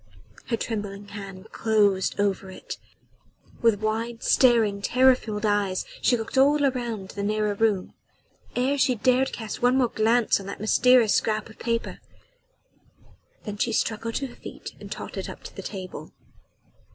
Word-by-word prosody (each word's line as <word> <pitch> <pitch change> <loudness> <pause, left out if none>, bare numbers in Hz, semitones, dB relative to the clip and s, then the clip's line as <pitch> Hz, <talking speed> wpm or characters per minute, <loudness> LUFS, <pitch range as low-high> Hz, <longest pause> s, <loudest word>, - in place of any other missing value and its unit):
Her 230 -1 0
trembling 205 -3 -5
hand 195 0 -9
closed 205 -4 +2
over 195 -1 0
it. 185 - -8 0.8
With 225 -3 +3
wide 225 +2 -2
staring 225 -6 +4
terror 255 +5 +5
filled 215 -4 -4
eyes 205 -3 +1 0.2
she 245 - +3
looked 225 +4 -2
all 285 +2 +5
round 240 -8 -1
the 200 - -5
narrow 210 0 0
room, 205 -3 0 0.6
ere 270 +3 +1
she 255 -1 +3
dared 255 +4 +2
cast 220 -3 -6
one 245 +2 +4
more 250 -3 +3
glance 225 +1 +2
on 195 - -9
that 200 - -6
mysterious 230 +1 +4
scrap 215 0 0
of - - -18
paper. 230 -1 -2 1.4
Then 210 -1 -6
she 230 - 0
struggled 225 +1 -1
to 275 - -1
her 250 - -9
feet - - -9
and - - -10
tottered - - -5
up - - -10
to - - -10
the - - -6
table. 185 -3 -7
220 Hz, 155 wpm, -25 LUFS, 205-245 Hz, 1.4 s, terror